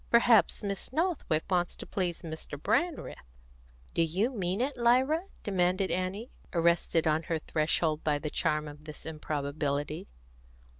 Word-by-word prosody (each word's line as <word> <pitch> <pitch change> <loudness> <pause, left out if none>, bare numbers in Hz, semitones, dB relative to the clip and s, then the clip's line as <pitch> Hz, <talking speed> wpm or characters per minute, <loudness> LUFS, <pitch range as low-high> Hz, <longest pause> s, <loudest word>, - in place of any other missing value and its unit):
Perhaps 235 -3 +5
Miss 200 +2 -3
Northwick 305 - 0
wants 175 -2 +1
to - - -8
please 180 -3 -2
Mr. 160 -3 -6
Brandreth." 335 - 0 0.7
"Do - - +2
you 185 +10 +1
mean 190 -4 -1
it, 270 +4 0
Lyra?" 260 +8 +3 0.2
demanded 185 -1 +1
Annie, 185 +6 -2 0.2
arrested 170 -1 +2
on 155 0 +3
her 165 - +2
threshold 155 0 0
by 150 -2 +2
the 150 +1 -4
charm 150 0 0
of 150 +1 -11
this 155 -1 -8
improbability. 145 -1 -2
175 Hz, 140 wpm, -30 LUFS, 155-215 Hz, 0.7 s, Perhaps